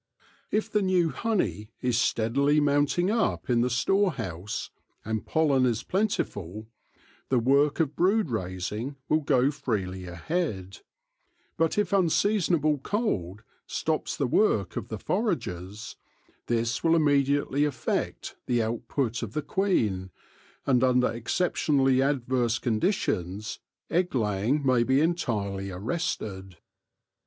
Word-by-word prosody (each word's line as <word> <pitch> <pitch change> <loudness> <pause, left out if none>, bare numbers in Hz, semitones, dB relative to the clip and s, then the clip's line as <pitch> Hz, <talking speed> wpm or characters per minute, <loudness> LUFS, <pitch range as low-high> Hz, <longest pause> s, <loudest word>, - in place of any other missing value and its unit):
If 215 +1 0
the 210 -1 +1
new 185 -3 +2
honey 110 - -1
is 125 -2 0
steadily 120 +6 +2
mounting 145 +6 +2
up 220 - 0
in 120 -1 +3
the 125 - +1
storehouse, 120 - -1 0.3
and 110 0 -3
pollen 145 -5 +3
is 115 -2 -1
plentiful, 110 - -2 0.6
the 130 - +3
work 140 +6 +3
of 150 -3 0
brood 190 - +2
raising 105 +6 -3
will 155 - +3
go 140 -2 +2
freely 95 -10 -3
ahead; 95 - -3 0.8
but 165 +3 +1
if 210 - +1
unseason 195 0 +2
able 150 -2 +1
cold 110 - -2 0.2
stops - - -2
the - - +1
work - - +2
of - - -4
the - - -5
foragers, 95 +5 -3 0.5
this 115 0 0
will 165 0 +4
immediately 145 -2 +2
affect 150 -2 -2
the 120 -2 +2
output 115 +1 -2
of 115 -3 -5
the 150 - -2
queen, 115 - 0 0.6
and 130 -2 +3
under 125 -1 +3
exceptionally 135 +1 +1
adverse 125 -3 +1
conditions 110 - -1 0.3
egg 175 -2 0
laying 110 +5 0
may 130 -2 +4
be 130 +3 +3
entirely 105 - -1
arrested. 95 - -4
130 Hz, 120 wpm, -27 LUFS, 110-160 Hz, 0.8 s, will